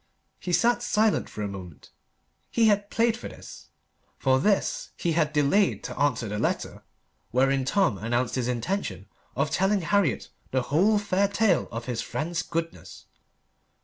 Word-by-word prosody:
He 180 - -4
sat 240 +6 +3
silent 220 -2 +1
for 105 - -5
a - - -1
moment. 95 -5 -10 0.6
He 230 - +2
had 205 -1 +2
played 230 0 +2
for 235 - -7
this - - -12 0.5
for 130 -1 +2
this 200 +7 0
he 170 - 0
had 155 -2 +1
delayed 155 +7 +2
to - - -6
answer 125 -5 +1
the 105 +1 -3
letter - - -2 0.5
wherein 135 +1 +2
Tom 155 - +1
announced 120 +3 -1
his 125 -2 -1
intention 125 - -2 0.3
of 140 +2 0
telling 195 +1 +2
Harriet 185 - +1 0.2
the 130 -1 0
whole 190 - +3
fair 200 -1 +1
tale 200 -3 +2
of 115 +1 -5
his 120 -3 -2
friend's 165 +1 -3
goodness. 165 0 -5
165 Hz, 155 wpm, -26 LUFS, 125-200 Hz, 0.6 s, sat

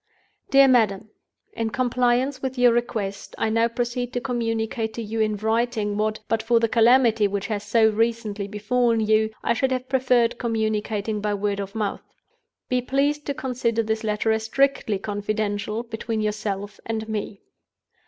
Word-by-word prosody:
"DEAR 275 0 +7
MADAM, 220 -4 +2 0.4
"In 225 -1 -2
compliance 250 +2 +1
with 260 -1 -3
your 245 -1 +5
request, 215 -5 -3
I 220 - 0
now 230 +1 +3
proceed 240 +1 -3
to 245 - 0
communicate 225 -2 -2
to 235 - -4
you 225 +1 -4
in 215 -1 +1
writing 220 -1 0
what 215 +1 -1
(but 225 -1 0
for 230 +1 +3
the 230 - +2
calamity 230 -2 +4
which 200 0 -3
has 210 -3 -3
so 225 0 +4
recently 220 -2 -1
befallen 230 +3 +1
you) 220 0 +3
I - - +2
should 260 +3 0
have 255 0 -2
preferred 250 -3 +2
communicating 220 -2 -1
by 210 0 0
word 200 0 -1
of 200 +1 -6
mouth. 210 -3 -4 0.5
Be 250 0 +1
pleased 285 +4 0
to 285 - -1
consider 235 -4 -1
this 220 +1 -2
letter 215 +1 0
as 220 0 0
strictly 270 -4 +1
confidential 205 +1 -2
between 225 -1 -4
yourself 205 -1 -3
and 220 -1 -3
me. 210 -2 -4
225 Hz, 165 wpm, -24 LUFS, 210-245 Hz, 0.5 s, DEAR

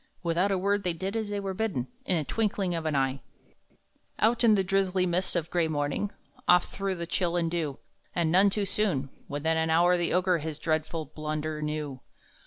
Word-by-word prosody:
Without 175 +3 +2
a 195 - +1
word 200 +2 +1
they 180 -3 0
did 190 +5 -4
as 220 -2 -2
they 205 0 -2
were 195 -1 -3
bidden, 185 - -1 0.2
In 165 -5 +1
twinkling 200 -1 0
of 165 -1 -2
an 155 - 0
eye, 135 -1 +1 1.0
Out 230 +3 +3
in 220 -2 +6
the 195 - +2
drizzly 190 -1 +1
mist 180 +2 0
of 170 -3 +1
a - - -26
gray 170 -2 +2
morning, 150 +6 -1 0.4
Off 180 0 +4
through 195 -1 -2
the 170 -1 -4
chill 175 0 0
and 165 -1 0
dew, 155 -5 -2 0.4
And 170 -2 +2
none 190 +3 +6
too 200 +1 0
soon! 185 -10 0 0.2
Within 160 +3 0
an 160 0 +1
hour 175 +2 +4
the 175 -1 0
Ogre 180 -1 +2
His 155 -1 -4
dreadful 155 0 -1
blunder 155 +1 -4
knew. 150 -3 -3
175 Hz, 200 wpm, -28 LUFS, 155-195 Hz, 1.0 s, in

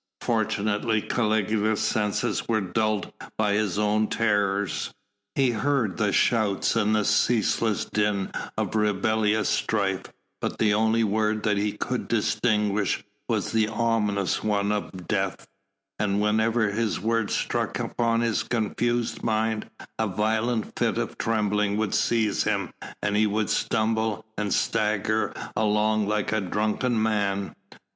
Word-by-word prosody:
Fortunately 110 0 0
Caligula's 110 -1 0
senses 110 -2 0
were 110 -2 +2
dulled 105 +2 -1 0.2
by 105 -2 +2
his 105 -3 0
own 105 +1 +2
terrors. 100 -4 0 0.4
He 135 -3 +3
heard 115 -3 0
the 105 -2 +1
shouts 110 -3 +2
and 110 -1 +2
the 105 -1 +1
ceaseless 110 -2 +2
din 105 -2 0 0.3
of - - -1
rebellious 105 0 +1
strife 95 -3 0 0.3
but - - -3
the 105 -2 +3
only 110 +2 +2
word 110 0 0
that 105 -1 +1
he 105 +1 0
could 125 +3 -3
distinguish 105 -3 +1 0.3
was - - 0
the 110 -1 +2
ominous 105 -4 0
one 105 -1 +1
of 95 -3 -4
"Death," - - -2 0.5
and 100 -1 +1
whenever 110 +1 +2
this 110 0 -1
word 115 +1 0
struck - - -1
upon 115 -1 0
his 115 -2 +1
confused 120 +1 -1
mind 110 -1 -1 0.3
a 110 - +2
violent 110 +3 0
fit - - +1
of - - -2
trembling 105 -2 +1
would 110 -2 -1
seize 115 -3 +1
him - - -1 0.3
and 105 0 +1
he 105 +1 +4
would 105 0 0
stumble 110 0 0
and 105 -2 -2
stagger 105 0 +1 0.2
along 105 0 +2
like 105 0 0
a 110 -1 +1
drunken 110 +5 0
man. 100 -3 0
110 Hz, 135 wpm, -25 LUFS, 105-110 Hz, 0.5 s, he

